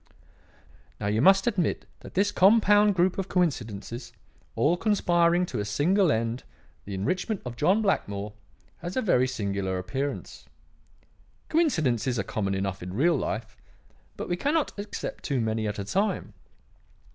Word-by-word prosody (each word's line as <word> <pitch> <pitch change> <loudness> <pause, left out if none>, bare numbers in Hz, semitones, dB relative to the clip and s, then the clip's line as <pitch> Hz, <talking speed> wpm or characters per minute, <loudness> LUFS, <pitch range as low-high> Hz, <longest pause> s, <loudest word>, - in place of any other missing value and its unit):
"Now 105 - -4
you 105 +2 +1
must 195 +5 +6
admit 200 -9 0
that - - -13
this 200 +2 +2
compound 205 +1 +5
group 185 +2 +2
of 190 - -3
coincidences, 120 - -2 0.4
all 160 +4 +3
conspiring 175 -4 +2
to - - -4
a - - -1
single 165 - +2
end 115 +1 -1 0.4
the 100 - -5
enrichment 180 - -1
of 120 -1 -5
John 190 - +2
Blackmore 105 - -1 0.5
has 175 +4 -5
a - - +2
very 130 - +3
singular 100 -6 -2
appearance. 135 +10 -4 1.0
Coincidences 140 - +1
are - - 0
common 100 -2 -2
enough 95 0 -3
in 90 +1 -6
real 165 +8 +3
life; 110 -4 -3 0.6
but - - -5
we 175 - 0
cannot 295 - +1
accept 205 0 -6
too 140 -4 -1
many 110 -1 -1
at 105 - -3
a 100 - -3
time. 195 - -1
145 Hz, 145 wpm, -27 LUFS, -, 1.0 s, must